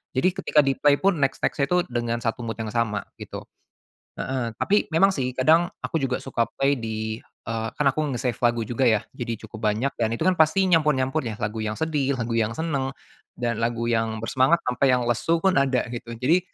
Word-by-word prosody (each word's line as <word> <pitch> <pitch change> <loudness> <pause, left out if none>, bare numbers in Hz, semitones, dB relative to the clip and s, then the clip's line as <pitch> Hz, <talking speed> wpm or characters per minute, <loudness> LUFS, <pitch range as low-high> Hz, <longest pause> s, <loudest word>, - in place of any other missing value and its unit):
jadi 175 +9 +3
ketika 155 -3 +2
di-play 140 +1 +3
pun 190 +3 +1
next-next-nya 135 +1 +1
itu 180 - +2
dengan 120 -1 -1
satu 115 +1 -1
mood 115 -1 -4
yang 110 -2 -5
sama 110 -3 0 0.2
gitu, - - -7 0.7
heeh, 130 -3 -2
tapi 205 +1 +1
memang 190 +5 +4
sih 125 -4 -3
kadang 160 +6 +4 0.2
aku 165 - -1
juga 130 -2 0
suka 115 -4 0
play 135 +1 +2
di 110 -3 -3 0.2
eee, 115 0 -3
kan 150 - 0
aku 155 - -2
nge-save 120 -1 -2
lagu 120 -1 +1
juga 120 +3 0
ya 110 -2 +3
jadi 120 -1 -4
cukup 110 - -9
banyak 115 +7 0
dan 115 - +2
itu 115 - -3
kan 185 - +4
pasti 160 +5 +4
nyampur-nyampur 150 -3 +2
ya 110 - -3
lagu 105 +1 -3
yang 110 0 -2
sedih, 145 -4 0
lagu 120 -1 -3
yang 115 0 0
seneng, 140 -5 -2 0.4
dan 120 -2 -2
lagu 115 0 -1
yang 115 -1 0
bersemangat 130 +8 +2
sampai 125 +2 +1
yang 125 - +1
lesu 120 +8 +1
pun 190 - +4
ada 135 -2 +2
gitu 115 -1 -6
jadi 150 +10 +3
125 Hz, 200 wpm, -24 LUFS, 115-150 Hz, 0.7 s, memang